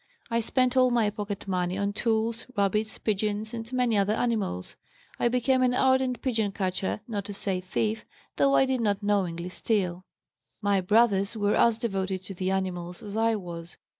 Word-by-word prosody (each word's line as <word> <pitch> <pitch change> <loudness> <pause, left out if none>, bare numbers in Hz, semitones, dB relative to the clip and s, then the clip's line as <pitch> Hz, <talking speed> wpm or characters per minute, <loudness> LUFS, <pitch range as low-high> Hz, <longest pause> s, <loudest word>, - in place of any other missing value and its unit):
I 230 - +2
spent 250 +2 +1
all 255 -1 +5
my 230 -4 +2
pocket 205 -2 -5
money 180 -1 -1
on 200 0 -1
tools, 225 +1 -1
rabbits, 210 +2 0
pigeons 215 +1 -1
and 230 0 -6
many 250 -3 +1
other 200 +2 +2
animals. 215 - -1 0.4
I - - +3
became 250 +2 +2
an 250 -1 +3
ardent 260 -1 +2
pigeon 220 -6 0
catcher, 190 +1 -2
not 210 -4 -3
to 205 -1 -5
say 190 -2 0
thief, 215 +4 -1 0.3
though 275 0 +4
I 270 - +5
did 260 -2 0
not 205 -2 0
knowingly 180 -4 0
steal. 185 -3 -1 0.5
"My 200 -2 +2
brothers 205 +1 +3
were 205 -1 +2
as 230 -2 +4
devoted 195 -5 -2
to 195 - -6
the 185 0 -2
animals 180 -2 -3
as 205 -1 -7
I 225 0 +2
was. 170 -3 -8
210 Hz, 175 wpm, -27 LUFS, 190-230 Hz, 0.5 s, all